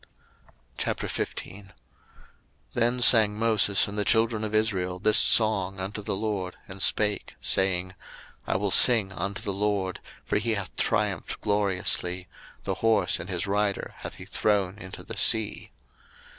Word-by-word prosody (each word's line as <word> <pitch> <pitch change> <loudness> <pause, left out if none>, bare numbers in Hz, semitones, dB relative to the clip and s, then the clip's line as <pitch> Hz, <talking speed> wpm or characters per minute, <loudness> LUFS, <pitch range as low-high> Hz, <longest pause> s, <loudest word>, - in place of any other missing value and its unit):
02:015:001 100 +2 -5 1.0
Then 120 +1 0
sang 110 -4 +6
Moses 105 -3 +2
and 105 +1 -5
the - - +2
children 110 +1 +1
of 110 0 -3
Israel 95 -5 0
this 105 +3 +3
song 100 -4 +3
unto 100 +3 -6
the 100 - -4
LORD, 100 -3 -4
and 95 0 -7
spake, 105 0 0
saying, 95 -1 0 0.5
I - - -1
will 100 0 -2
sing 110 -3 +7
unto 95 +3 -5
the 100 - -3
LORD, 100 -2 -2 0.3
for - - -1
he 115 +1 -2
hath 100 -2 -7
triumphed - - -2
gloriously: 95 -3 0 0.4
the - - -3
horse 115 -1 +2
and 90 - -8
his 90 -2 -2
rider 100 0 -2
hath - - -9
he - - -11
thrown 100 -2 -1
into 95 - -11
the - - -8
sea. 110 -2 +2
100 Hz, 145 wpm, -25 LUFS, 95-110 Hz, 1.0 s, sing